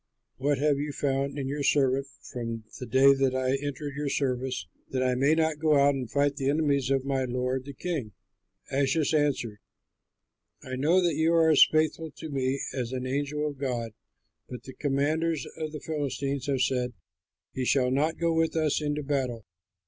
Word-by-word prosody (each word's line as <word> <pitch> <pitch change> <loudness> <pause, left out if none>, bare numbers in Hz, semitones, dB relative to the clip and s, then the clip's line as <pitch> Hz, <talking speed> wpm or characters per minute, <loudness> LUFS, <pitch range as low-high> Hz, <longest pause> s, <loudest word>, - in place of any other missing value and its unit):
What 140 +2 +1
have 145 0 +2
you 145 +1 -2
found 140 0 -1
in 135 -2 -2
your 145 +2 -3
servant 135 -1 +2 0.3
from 115 -3 -4 0.2
the 125 - -6
day 135 +4 +6
that 135 -1 +1
I 130 0 +1
entered 145 0 -4
your 145 0 -2
service, 130 -8 -1 0.2
that 130 -1 -1
I 130 -1 +2
may 140 +5 +3
not 160 -2 +1
go 155 -1 +3
out 140 +1 +5
and 130 -4 -4
fight 145 0 +1
the 135 -1 0
enemies 140 -3 +1
of 135 -1 +1
my 135 -1 0
lord 125 +1 -2
the 140 - -7
king?" 150 -9 -3 0.6
Achish 140 +3 +1
answered, 140 -8 0 1.0
"I 130 0 -5
know 165 +8 +3
that 170 -2 +2
you 160 +2 +2
are 165 -1 +5
as 150 - +8
faithful 155 +1 +1
to 160 - -7
me 135 0 0
as 125 -3 -3
an 130 -1 -3
angel 145 +3 -1
of 145 -2 -6
God, 120 -4 -2 0.6
but 125 - -8
the 130 - -10
commanders 150 +2 0
of 155 -1 -4
the 150 - -6
Philistines 140 -2 -3
have 135 -2 0
said, 125 -1 0 0.6
'He 130 - -2
shall 125 0 +2
not 150 +5 +1
go 170 -1 +1
with 165 0 +1
us 155 -2 +1
into 150 0 -2
battle.' 130 -6 -2
140 Hz, 185 wpm, -28 LUFS, 130-150 Hz, 1.0 s, as